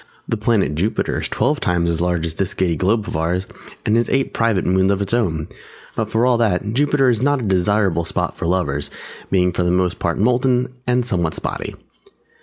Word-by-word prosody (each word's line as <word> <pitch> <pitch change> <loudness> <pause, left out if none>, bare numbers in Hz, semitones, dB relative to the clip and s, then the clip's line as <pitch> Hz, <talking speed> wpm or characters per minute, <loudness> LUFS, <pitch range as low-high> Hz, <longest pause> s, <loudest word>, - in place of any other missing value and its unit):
The - - 0
Planet 105 -6 +1
Jupiter 95 +9 -1
is - - -1
twelve 145 +3 +1
times 90 -1 +1
as 85 0 0
large 90 -2 0
as 80 - -3
this 95 +2 -2
Giddy 90 -3 +1
Globe 105 +5 +1
of - - -4
ours, 85 +4 0 0.4
and 110 - +2
has 120 +1 +2
eight 135 0 0
private 115 -5 +1
moons 95 +1 +3
of 100 - 0
its 100 +2 -2
own, 80 -10 0 0.5
but 110 -1 -2
for 115 +2 +2
all 125 -2 +3
that 105 -1 +1
Jupiter 145 +1 +2
is 115 - -1
not 145 +2 +3
a - - -4
desirable 95 -2 +1
spot 80 - -2
for - - -3
Lovers, 85 -6 0 0.4
being 90 -1 +2
for 90 - -2
the 90 - +1
most 90 0 +1
part 85 -1 -1
molten, 125 +3 +2 0.2
and 125 0 +2
somewhat 85 -9 -1
spotty. - - -4
95 Hz, 210 wpm, -20 LUFS, 90-115 Hz, 0.5 s, moons